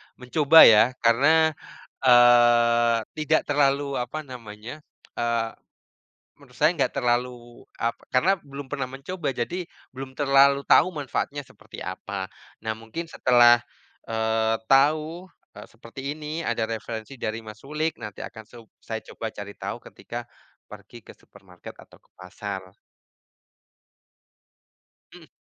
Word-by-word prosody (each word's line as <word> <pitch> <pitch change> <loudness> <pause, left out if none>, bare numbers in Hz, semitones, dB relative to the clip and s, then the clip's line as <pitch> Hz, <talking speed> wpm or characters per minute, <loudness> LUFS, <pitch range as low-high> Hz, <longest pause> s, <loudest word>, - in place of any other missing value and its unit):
mencoba 145 +5 +6
ya 110 -1 +8 0.2
karena, 155 +7 +4 0.5
eee, 120 -2 +5 0.2
tidak 155 +1 +2
terlalu, 140 -1 +1
apa 155 +6 -5
namanya, 120 0 -10 0.4
eee, 115 -1 0 0.9
menurut 125 -3 -18
saya 155 +4 +3
enggak 145 - 0
terlalu, 125 -1 +1 0.5
apa 115 0 -2
karena 160 +10 +3
belum 140 0 -9
pernah 135 -3 -3
mencoba, 145 +5 -5
jadi 130 +8 -3 0.4
belum 130 0 -9
terlalu 140 0 +4
tahu - - +5
manfaatnya 145 -2 -4
seperti - - -15
apa. 100 -1 -5 0.4
Nah, 110 - -1
mungkin 115 +10 -7
setelah, 120 -1 +5 0.5
eee, 110 0 0
tahu, 155 +7 +2 0.2
eee, - - -11
seperti 115 +3 -12 0.2
ini, 155 +2 -5
ada 115 -4 -1
referensi 115 +2 -6
dari, 110 -3 -5
Mas 105 0 -11
Rulik, 155 +3 -2
nanti 105 -2 -7
akan 110 - -11
sub 115 -2 -14 0.2
saya 110 -1 -6
coba 115 - -5
cari 100 -1 -9
tahu - - -6
ketika - - -8 0.4
pergi - - -13
ke - - -13
supermarket - - -15
atau - - -17
ke - - -35
pasar. 95 0 -8 2.4
Mhm. - - -15
125 Hz, 125 wpm, -24 LUFS, 115-145 Hz, 2.4 s, ya